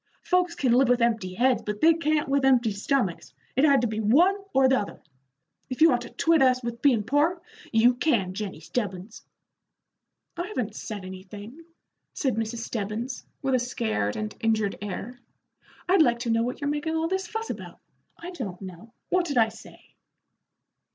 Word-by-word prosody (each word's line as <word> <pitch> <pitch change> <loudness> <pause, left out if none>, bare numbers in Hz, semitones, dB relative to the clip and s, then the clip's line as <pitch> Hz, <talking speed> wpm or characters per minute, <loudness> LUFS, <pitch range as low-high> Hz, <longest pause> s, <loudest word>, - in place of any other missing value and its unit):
Folks 360 -2 +1
can 260 -6 +1
live 255 +1 +4
with 245 0 +4
empty 220 -6 0
heads, 250 +3 +2
but 210 0 -4
they 330 +1 +6
can't 310 -2 0
with 275 0 +1
empty 250 -4 +4
stomachs. 200 -2 -1 0.2
It 265 - +2
had 280 -3 +5
to 240 - +1
be 215 0 -3
one 295 - +4 0.2
or 265 0 +4
the 260 0 +3
other. 205 - -6 0.7
If 255 - -5
you 325 +1 +7
want 245 -1 +1
to 240 - -8
twit 330 -2 +2
us 255 -1 +3
with 235 0 -5
bein' 245 -7 +3
poor, 290 - +1 0.3
you 235 +2 +5
can, 230 -9 0
Jennie 195 -5 -5
Stebbins." 200 +2 -5 1.1
"I 345 +2 -4
haven't 245 - -4
said 205 -4 -6
anything," 205 - -10 0.5
said 265 -4 0
Mrs. 225 +1 -3
Stebbins, 225 +4 -4 0.2
with 270 -1 0
a 255 - +4
scared 220 - -2
and 215 -1 -4
injured 220 -3 0
air. 205 +5 -6 0.7
"I'd 365 -1 +5
like 240 -6 +4
to 235 -1 -1
know 225 0 +2
what 245 +4 -3
you're 285 - -1
making 300 +2 -2
all 320 0 0
this 380 +1 -2
fuss 445 +3 -4
about? - - -9 0.4
I 340 +2 -8
don't 205 - -6
know. 190 +4 -11 0.2
What 365 -1 +2
did 285 -4 -2
I 225 -1 +5
say?" - - -15
245 Hz, 185 wpm, -26 LUFS, 215-290 Hz, 1.1 s, you